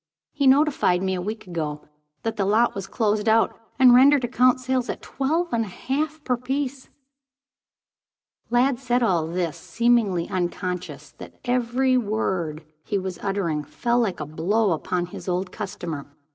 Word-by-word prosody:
He 280 -2 +1
notified 265 - +3
me, 190 0 0
a 180 - -2
week 215 +4 -5
ago, 155 -4 -4 0.4
that 225 -1 -2
the 205 - 0
lot 215 +5 +3
was 195 -1 -5
closed 210 +1 0
out, 225 +1 +3 0.2
and 255 -2 +7
rendered 270 +2 +6
account 250 +1 +3
sales 255 -1 -1
at - - -3
twelve 320 +6 -1
and 230 -1 +2
a - - -6
half 295 - -3
per 250 -2 0
piece." 265 +1 -3 1.6
Lladd 245 +2 +2
said 250 -1 +1
all 175 -8 +2
this 170 -1 -2
seemingly 230 -7 +1
unconscious 180 0 -4
that - - -10
every 250 +1 +2
word 185 -9 -2 0.2
he 205 - -1
was 190 -2 -4
uttering 185 -7 -1
fell 240 - 0
like 215 -6 0
a 150 - -3
blow 185 +8 +1
upon 175 +2 -1
his 175 - -10
old 180 +1 -1
customer. 175 -8 -6
220 Hz, 160 wpm, -24 LUFS, 180-255 Hz, 1.6 s, and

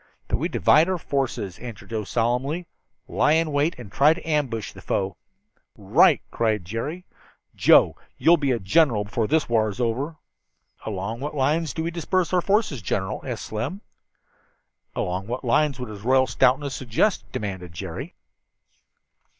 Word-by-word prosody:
"That - - +1
we - - -2
divide 160 +4 +4
our 185 - 0
forces," 135 - -3
answered 115 -3 -9
Joe 110 -2 -2
solemnly, 125 - -1 0.4
"lie 150 - +2
in 160 -1 +2
wait 145 +3 +1
and 115 -6 -10
try 150 +9 +4
to 165 - -10
ambush 130 - -1
the - - -12
foe." 95 -2 -1 0.6
"Right!" - - +4
cried 110 -5 0
Jerry. 145 - -4 0.5
"Joe, - - +5 0.2
you'll 170 - +5
be 140 -3 -1
a 125 - +2
general 115 - +3
before 105 +2 -2
this 160 0 +2
war's 110 -2 0
over." 130 +7 -1 0.7
"Along 105 +2 -3
what 145 +3 -5
lines 150 +3 +1
do 160 - -3
we 170 - -2
disperse 175 +2 -1
our 180 - +4
forces, 195 - +1
General?" 95 -1 -2
asked - - -5
Slim. 115 - -4 1.1
"Along 90 +2 -2
what 125 +3 -4
lines 140 +3 +2
would 125 -2 -5
His 105 -2 -9
Royal 130 +3 +4
Stoutness 135 +2 +2
suggest?" 130 - 0
demanded 95 -4 -5
Jerry. 85 -1 -7
125 Hz, 155 wpm, -24 LUFS, 110-155 Hz, 1.1 s, Joe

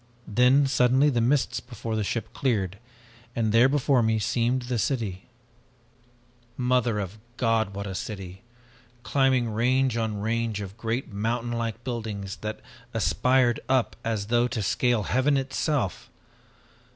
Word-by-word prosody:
Then 125 +6 +4
suddenly 135 +2 +3
the 120 -3 +1
mists 125 0 +1
before 115 -2 -5
the 110 - 0
ship 115 +2 -3
cleared 100 -8 -1 0.6
and 110 -2 +1
there 115 +4 +6
before 140 -2 +3
me 110 -1 +2
seemed 120 +4 0
the 120 -1 -2
city. 105 -8 -2 1.3
"Mother 125 -3 +1
of 100 +1 -5 0.2
God, 110 -4 +1
what 100 0 -4
a 95 - -5
city! 95 -1 -6 0.6
Climbing 130 0 +2
range 125 +2 +2
on 110 -2 -1
range 110 0 -1
of 100 -1 -7
great 115 +1 -3
mountain 115 +3 -1
like 115 0 -3
buildings 110 -5 -4
that 110 0 -5 0.3
aspired 125 -2 +2
up 130 -2 +2
as 110 -3 -1
though 120 +2 +2
to 110 -3 -3
scale 110 +2 +1
heaven 135 +6 +2
itself! 135 - -1
115 Hz, 140 wpm, -26 LUFS, 105-125 Hz, 1.3 s, there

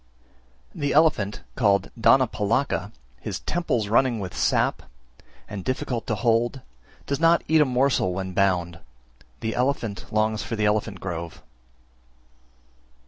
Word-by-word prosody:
324. - - -10
The 145 - 0
elephant 135 -11 +2
called 100 -5 +2
Dhanapalaka, 115 -1 +2 0.3
his - - -5
temples 130 -11 -1
running 120 +2 +2
with 95 -2 -6
sap, - - +1 0.7
and 100 -2 -6
difficult 125 -1 -3
to 110 - 0
hold, 120 +4 +1 0.4
does 140 0 -2
not 165 +1 +4
eat 160 -1 +4
a - - +5
morsel 130 -6 +1
when 95 0 -4
bound; 90 -3 +1 0.6
the 110 0 -2
elephant 120 -6 -2
longs 110 0 +1
for 115 - -4
the 105 -1 0
elephant 105 -2 0
grove. 85 -3 -6
110 Hz, 130 wpm, -24 LUFS, 100-130 Hz, 0.7 s, a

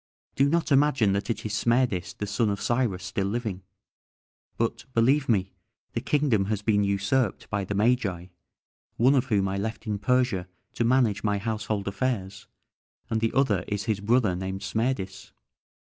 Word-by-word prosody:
Do 140 +1 +3
not 165 0 0
imagine 135 -7 +4
that 100 +3 -2
it 110 -1 -2
is 110 - -3
Smerdis, 115 -4 +1
the 105 - -3
son 105 +2 0
of 100 -1 -2
Cyrus, 115 -7 0
still 95 +2 -2
living; 105 -3 -3 1.0
but, 115 0 -1
believe 135 +5 +3
me, 95 -4 +1 0.4
the - - -2
kingdom 140 -9 +2
has 105 0 -2
been 105 -2 +2
usurped 100 +4 0
by 100 -2 -1
the 100 - -3
Magi, 100 -5 +1 0.7
one 130 +4 +5
of 135 -3 +2
whom 100 -6 +1
I 95 +1 -2
left 110 +3 -4
in 105 -2 -2
Persia 120 -4 +1 0.3
to - - -1
manage 120 -4 +2
my 105 -1 +1
household 105 -1 -3
affairs, 100 -2 -3 0.6
and 110 0 0
the 115 - 0
other 110 -9 +2
is 105 -1 -2
his 105 0 -1
brother 110 -2 +2
named 95 +1 -4
Smerdis." 110 -5 -2
110 Hz, 165 wpm, -26 LUFS, 100-125 Hz, 1.0 s, one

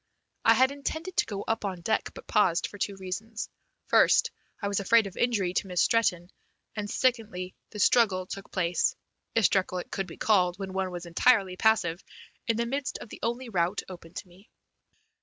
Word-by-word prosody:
I 225 - +6
had 260 +3 +4
intended 315 +5 -5
to - - +3
go 200 -2 -4
up 225 0 -2
on 190 -3 -3
deck, 220 +5 0
but - - -10
paused 175 -5 +2
for 205 - -8
two 200 +1 -1
reasons. 200 +4 -5 0.4
First - - +4 0.3
I 200 - -2
was 200 0 0
afraid 225 +3 +4
of 195 - -7
injury 205 -7 +1
to 195 - -1
Miss 180 -1 -2
Stretton, 180 -6 +1 0.4
and 210 -1 -3
secondly 220 -8 0 0.2
the 210 - -10
struggle 200 -3 +3
took 195 +1 -8
place, 175 -2 +1 0.4
if 225 -3 +4
struggle 185 -1 +2
it 180 - -6
could 195 -2 -2
be 165 - -10
called 180 -4 +2
when 190 -1 -6
one 190 -1 -1
was 175 -1 -6
entirely 190 +2 +3
passive, 185 -5 +2 0.4
in 230 -2 +1
the 235 - 0
midst 270 +3 -2
of - - -10
the - - -10
only 240 +2 -2
route 180 -1 0
open 175 -3 -10
to - - -6
me. 185 +4 -20
200 Hz, 195 wpm, -28 LUFS, 185-225 Hz, 0.4 s, I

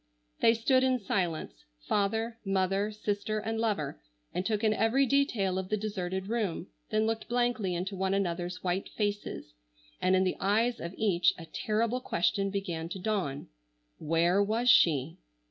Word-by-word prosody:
They 230 - +5
stood 255 +3 +3
in 260 -1 +3
silence, 175 - -2 0.2
father, 225 +3 0
mother, 195 +1 0
sister, 210 0 -2
and 225 +1 -2
lover, 215 - -1 0.3
and 180 - -1
took 210 +2 -1
in 215 -1 +4
every 225 +6 +3
detail 235 -9 +1
of 190 0 -5
the 215 - +1
deserted 190 -3 -3
room, 205 -6 -2 0.2
then 215 0 +2
looked 225 0 -2
blankly 240 -6 0
into 190 +3 -3
one 190 +1 0
another's 180 -1 -2
white 185 +1 -1
faces, 205 - -3 0.5
and 185 +1 +3
in 185 - +3
the 185 - 0
eyes 225 +5 +1
of 170 +2 -6
each 180 -5 +3
a 165 - -9
terrible 225 +7 -1
question 195 0 0
began 175 -5 -3
to 185 - -5
dawn. 185 -9 -2 0.5
Where 170 +5 +2
was 225 +4 +3
she? 150 -2 +4
200 Hz, 160 wpm, -30 LUFS, 185-225 Hz, 0.5 s, They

